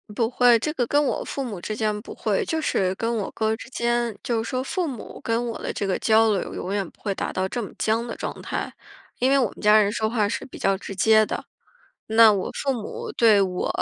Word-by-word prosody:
不 225 0 +1
会， 245 -1 +5
这 305 - -2
个 245 -6 -1
跟 290 +1 +3
我 - - -1
父 275 - -4
母 215 -8 -5
之 215 +5 -4
间 210 -1 -1
不 - - -10
会。 460 - 0
就 320 -3 -1
是 190 -9 0
跟 230 +3 -1
我 205 - -2
哥 220 0 0
之 - - -11
间， 240 -3 -1
就 230 -2 0
说 255 +3 -2
父 350 +5 -2
母 250 -6 -7
跟 230 +1 -1
我 230 - -5
的 - - -3
这 200 - -2
个 190 - -1
交 220 0 +4
流 200 - -2
永 190 +2 -4
远 195 -3 -1
不 - - -28
会 200 - -1
达 - - -4
到 185 - 0
这 240 - -3
么 205 - -6
僵 225 +2 0
的 230 - -5
状 - - -5
态。 - - -4 0.5
因 255 - +3
为 275 - +4
我 250 - +3
们 - - -17
家 210 0 +6
人 205 -1 +1
说 220 0 -1
话 215 -3 +1
是 230 - -3
比 265 - -11
较 195 0 +1
直 195 0 -8
接 215 +3 +5
的， - - -4 0.6
那 220 0 +7
我 195 -2 -2
父 275 - -1
母 430 - -6
对 220 - +5
我 180 -2 -1
225 Hz, 270 characters per minute, -24 LUFS, 210-245 Hz, 0.6 s, 那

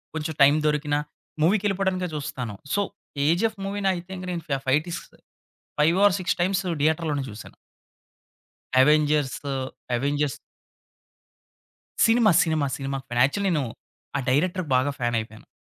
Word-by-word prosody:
కొంచెం 160 0 -3
టైమ్ 145 +2 +7
దొరికినా 150 0 +1 0.4
మూవీకెళ్ళిపోవడానికే 190 0 +1
చూస్తాను. 130 -7 -4 0.2
సో 205 - +2 0.4
'కేజీఎఫ్' 175 +10 +1
మూవీనయితే 190 -2 -2 0.2
నేను 170 -2 -4
ఫ్యా 140 -2 0
ఫైటిస్ 155 +6 +1 0.8
5 165 +5 +4
ఆర్ 200 - +5
6 180 - 0
టైమ్స్ 190 +1 +1 0.2
థియేటర్‌లోనే 155 -2 +1
చూసాను. 105 - -10 1.3
Avengers 150 -1 +2 0.4
Avengers. 145 +2 -1 1.7
Cinema! 225 -2 +5
Cinema! 155 -4 +1
Cinema! 135 0 -3
Fan 120 0 +2
actually 200 +8 0
నేను 150 -6 +1 0.5
ఆ - - -1
డైరెక్టర్‌కి 175 +2 0
బాగా 135 +3 +2
ఫ్యాన్ 120 -1 0
అయిపోయాను. 110 0 -11
150 Hz, 115 wpm, -25 LUFS, 140-185 Hz, 1.7 s, టైమ్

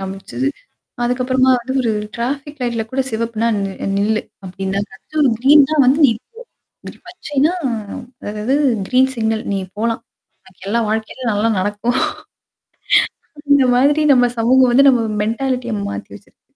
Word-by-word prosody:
காமிச்சுது. 195 +8 -4 0.6
அதுக்கப்புறமா 255 +1 +1
வந்து 250 +2 -5
ஒரு 225 -2 0 0.2
டிராஃபிக் 275 +4 -4
லைட்ல 235 -2 -1
கூட 265 - -1
சிவப்புனா 230 0 -1
ந 195 -1 -2 0.3
நில்லு 215 +2 +1 0.2
அப்படின்னா 190 +1 -3 0.4
ஒரு 275 - +4
கிரீன் 285 +2 +6
தான் 295 -4 +4
வந்து 270 +4 +4
நிக்கும். 225 -3 -2 0.8
பச்சைனா 305 -3 -1 0.8
அதாவது 215 +6 -1 0.3
கிரீன் 260 +1 +3
சிக்னல் 220 -2 -1
நீ 195 - 0 0.2
போலாம். 230 +1 -1 0.5
உனக்கெல்லாம் 200 +4 -3
வாழ்க்கையிலயும் 220 +2 -2
நல்லா 210 +2 +1
நடக்கும். 205 +6 -1 1.5
அந்த 285 -2 +5
மாதிரி 290 +4 +3
நம்ம 245 -1 +4
சமூகம் 250 +2 +4
வந்து 275 +3 +6
நம்ம 250 -3 +4 0.2
மென்டாலிட்டியா 245 +1 -2
மாத்தி 205 - -6
வச்சிருக்கு. 210 - -17
240 Hz, 125 wpm, -18 LUFS, 220-265 Hz, 1.5 s, கிரீன்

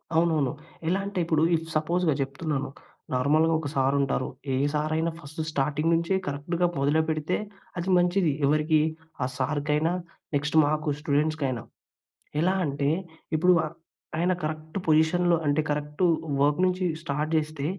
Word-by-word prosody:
అవునవును. 160 -5 +3 0.4
ఎలా 185 +3 +2
అంటే 200 -2 -3
ఇప్పుడు 160 -1 +2
ఇఫ్ 165 0 -3
సపోజ్‌గా 165 +1 +2
చెప్తున్నాను, 135 +1 -2 0.4
నార్మల్‌గా 155 +5 +3
ఒక 150 - -4
సార్ 135 +1 +2
ఉంటారు. 130 -1 0 0.3
ఏ - - +2 0.2
సార్ 155 +1 0
అయినా 165 +1 0
ఫస్ట్ 155 +1 -7
స్టార్టింగ్ 150 +3 0
నుంచే 170 +3 0
కరెక్ట్‌గా 165 +5 0
మొదలు 145 +3 +3
పెడితే, 155 +3 0 0.4
అది 175 +2 -2
మంచిది. 175 -2 +3
ఎవరికీ 155 +2 +3 0.4
ఆ - - +2
సార్కైనా, 150 +4 0 0.4
నెక్స్ట్ 150 +2 -1
మాకు 155 +1 0
స్టూడెంట్స్‌కైనా. 145 -5 0 0.8
ఎలా 185 +3 +2
అంటే, 140 0 0 0.5
ఇప్పుడు 180 +3 +5
అ - - -3 0.5
ఆయన 180 +2 +2
కరెక్ట్ 155 +2 -4
పొజిషన్‌లో 170 +2 +4
అంటే 145 +2 +2
కరెక్ట్ 150 +3 -2 0.4
వర్క్ 145 +4 +3
నుంచి 185 0 0 0.2
స్టార్ట్ 150 0 -2
చేస్తే, 150 -2 -2
155 Hz, 140 wpm, -26 LUFS, 145-165 Hz, 0.8 s, ఇప్పుడు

